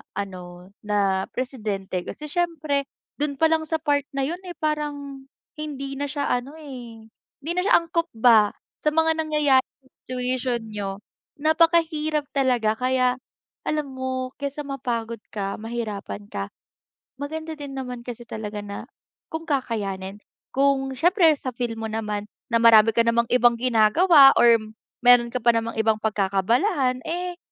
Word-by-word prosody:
ano, 185 -2 -7
na 200 -2 0
presidente. 210 -8 -3
Kasi 300 -1 -7
siyempre 310 -5 -1 0.3
dun 290 -1 -1
palang 320 +1 +2
sa 320 - -1
part 290 -2 0
na 275 - 0
yun 335 +6 -2
eh, 350 - -7
parang 290 -3 -3 0.3
hindi 275 -2 -5
na 285 - -1
siya 285 0 -2
ano 250 +4 -2
eh, 250 -7 -10
hindi 300 +6 -9
na 360 - 0
siya 395 - +4
angkop 335 0 -1
ba 220 -2 +5 0.2
sa - - -4
mga 320 +1 +2
nangyayari 300 -4 +3 0.2
sa - - -24 0.2
situation 250 -1 -1
niyo, 205 -2 -3 0.5
napakahirap 315 -1 +2
talaga, 250 -6 +2
kaya 255 0 +1 0.5
alam 300 -1 0
mo 260 -1 -3
kaysa 285 +1 -4
mapagod 235 -4 -3
ka, 200 -1 -4
mahirapan 220 -3 -5
ka, 100 0 -3 0.7
maganda 315 +3 -5
din 285 -2 -8
naman 250 -2 -5
kasi 240 -1 -7
talaga 210 -1 -5
na 200 +4 -7 0.4
kung 320 +1 -5
kakayanin, 205 -8 -2 0.4
kung 270 0 +2
siyempre 350 - +4
sa 255 - -5
feel 240 -2 -2
mo 225 - -4
naman 210 -2 -3 0.2
na 230 - +3
marami 225 -1 +7
ka 230 - +5
namang 230 0 +2
ibang 245 -1 +5
ginagawa 270 - +6
or 235 -1 +7 0.5
meron 245 -1 +7
ka - - +1
pa 235 0 +5
namang 230 0 -2
ibang 220 -1 +2
pagkakaabalahan 230 - +1
eh, 355 +1 -3
255 Hz, 145 wpm, -24 LUFS, 225-300 Hz, 0.7 s, marami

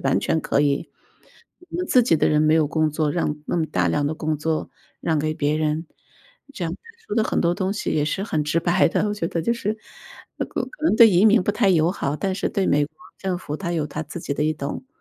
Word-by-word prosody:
完 135 0 +2
全 160 - 0
可 145 - +1
以。 140 -1 0 0.7
我 355 -1 -9
们 360 0 -2
自 250 - +5
己 195 -9 +3
的 - - +2
人 150 0 +3
没 155 +1 +4
有 155 -2 +3
工 155 0 +1
作， 150 0 0
让 160 -3 -1
那 - - -2
么 160 - 0
大 90 - 0
量 145 - +1
的 155 - -1
工 155 -1 -2
作 155 +1 -2 0.3
让 160 -2 0
给 155 +1 -1
别 145 0 0
人。 155 +1 -1 0.7
这 175 - -3
样， 165 - -2
他 - - -9 0.3
说 - - -3
的 220 - +3
很 - - -1
多 170 +1 +2
东 190 0 -1
西， 210 - -3
也 150 - +1
是 190 +5 -2
很 155 -8 -1
直 155 +3 0
白 175 +2 +3
的， 210 - 0
我 - - -1
觉 175 -5 -2
得 165 - -2
就 235 - +1
是 220 -2 -2 0.6
那 - - -2
个 - - -3
可 - - -8
能 215 - +3
对 230 -2 +8
移 185 +4 +5
民 215 -2 +5
不 205 - 0
太 210 -2 +2
友 170 -1 +3
好。 145 -5 -2
但 190 +1 -1
是 - - -1
对 195 -2 -1
美 145 0 +3
国 155 0 -27 0.2
政 190 -2 -2
府 155 -4 -6
它 175 -3 -3
有 155 -3 -1
它 150 +2 -5
自 160 +3 -8
己 140 - -3
的 145 - -1
一 155 0 +1
懂 145 - -5
160 Hz, 290 characters per minute, -23 LUFS, 150-195 Hz, 0.7 s, 对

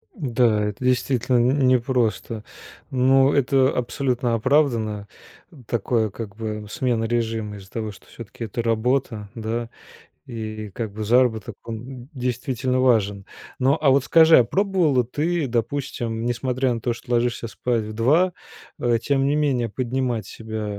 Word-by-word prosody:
Да, 120 - +1
это 105 +4 -5
действительно 125 -1 +1
н 130 +2 +3
не 130 0 +5
просто, 115 -3 -1 0.5
но 135 +1 +4
это 135 -1 +3
абсолютно 125 -1 -1
оправдано, 115 -5 +1 0.6
такое, 115 -1 0
как 100 0 -8
бы, 105 -1 -5
смена 120 -2 0
режима, 115 -3 -2
из-за 95 -1 -13
того, 110 -2 -4
что 100 - -17
всё-таки 115 0 -9
это 115 +2 -3
работа, 115 -2 0
да, 115 +1 -3 0.6
и 110 -3 -6
как 110 -4 -4
бы 110 0 -4
заработок- 115 -2 +2
он 120 +2 -7
д - - -23
действительно 125 0 -1
важен. 105 -6 +2 0.3
Но 135 +4 +3
а 140 - +4
вот 135 0 +3
скажи, 160 -1 +7
а 125 - +6
пробовала 180 - +2
ты, 155 +6 -1
допустим, 120 -2 -2
несмотря 125 +1 0
на 115 - -3
то, 120 +1 -1
что 120 - -10
ложишься 120 -1 0
спать 120 0 -1
в 110 0 -6
2, 155 +12 +3 0.5
э, 120 -2 +2
тем 135 -1 +1
не 145 - +2
менее, 135 -6 +1
поднимать 125 -2 -2
себя 110 -1 -6
120 Hz, 150 wpm, -23 LUFS, 110-130 Hz, 0.6 s, скажи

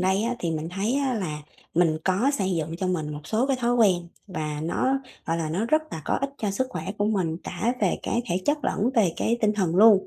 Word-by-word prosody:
đây 190 +3 +2
á 235 +2 0
thì 170 -8 -1
mình 160 0 -2
thấy 200 +7 -1
á 275 -2 +1
là 155 -8 -3 0.3
mình 160 -2 +3
có 195 +9 +3
xây 190 -2 0
dựng 160 0 -2
cho 185 +1 -2
mình 160 -5 -1
một 150 - -6
số 220 +9 +1
cái 270 -1 +1
thói 240 0 +2
quen, 185 -7 +3 0.2
và 155 -6 -3
nó, 260 +11 +1 0.3
gọi 165 - +1
là, 165 -2 -2
nó 185 +7 0
rất 310 +6 +3
là 160 - -5
có - - 0
ích 275 0 -1
cho 210 -2 -1
sức 260 +7 0
khỏe - - -5
của 205 - +2
mình, 185 -7 0
cả 220 +7 -1
về - - +2
cái 235 - 0
thể 180 +1 -1
chất 295 0 +1
lẫn 225 +5 +1
về 200 -8 +4
cái 235 +1 +1
tinh 215 -1 +3
thần 185 -5 0
luôn. 210 -2 +7
195 Hz, 255 wpm, -26 LUFS, 165-235 Hz, 0.3 s, luôn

